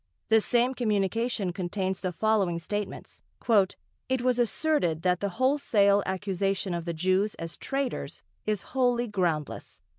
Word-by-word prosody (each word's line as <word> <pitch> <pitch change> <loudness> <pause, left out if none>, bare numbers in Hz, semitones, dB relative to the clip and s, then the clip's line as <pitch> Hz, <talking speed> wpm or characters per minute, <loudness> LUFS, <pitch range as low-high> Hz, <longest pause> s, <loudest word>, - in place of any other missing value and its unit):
The 220 0 +5
same 245 +3 +2
communication 215 -3 0
contains 190 +1 -2
the 185 - -2
following 195 -2 +1
statements: 205 +4 -5 0.9
"It 260 -1 0
was 250 -1 +2
asserted 230 - +1
that 180 -1 +2
the 200 - -1
wholesale 230 -7 +3
accusation 195 0 -1
of 170 -1 -3
the 170 - -2
Jews 185 +5 +1
as 165 0 -6
traitors 275 -1 -3 0.2
is 210 -4 0
wholly 245 -2 +2
groundless.... 175 -8 -2
200 Hz, 130 wpm, -28 LUFS, 185-240 Hz, 0.9 s, The